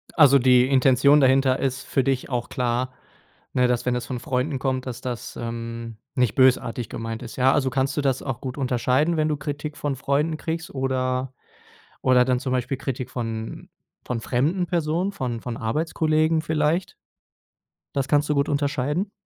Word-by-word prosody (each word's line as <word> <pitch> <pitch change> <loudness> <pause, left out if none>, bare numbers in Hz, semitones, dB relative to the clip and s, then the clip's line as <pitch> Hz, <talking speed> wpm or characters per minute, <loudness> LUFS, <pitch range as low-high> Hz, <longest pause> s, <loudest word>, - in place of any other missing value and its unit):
Also, 140 -4 +7
die 125 0 +5
Intention 135 +2 +5
dahinter 135 -1 +4
ist 135 0 -2
für 135 - +1
dich 135 0 -1
auch 120 -2 -2
klar. 125 +1 -1 0.6
Ne, 125 -1 +3
dass, 125 0 0
wenn 125 - +1
das 125 - -3
von 125 -2 -4
Freunden 130 +3 -1
kommt, 130 -1 -1
dass 125 0 -6
das, 125 -2 -5
ähm, 115 -1 -6 0.2
nicht 125 -3 +1
bösartig 125 -3 +2
gemeint 115 0 -5
ist. 120 - -8
Ja, 130 +1 +4
also 135 -3 +1
kannst 135 +2 0
du - - +2
das 135 -2 0
auch 130 -3 -4
gut 130 +1 -5
unterscheiden, 130 +5 +1
wenn 155 - +2
du 150 - 0
Kritik 145 +1 -5
von 145 -2 -2
Freunden 145 +4 0
kriegst, 160 0 -4
oder 130 -1 -1 0.7
oder 125 -1 +5
dann 125 -1 +1
zum 130 - -3
Beispiel 130 +1 -1
Kritik 130 -2 -4
von 115 -2 -5 0.4
von 120 -2 -3
fremden 155 - 0
Personen, 170 +3 0
von 125 - -4
von 120 -1 -5
Arbeitskollegen 155 +5 +1
vielleicht? 160 +3 0 1.0
Das 135 -1 0
kannst 145 +1 +2
du 150 - +2
gut 140 +1 +1
unterscheiden? 145 +6 -1
130 Hz, 175 wpm, -24 LUFS, 125-145 Hz, 1.0 s, Also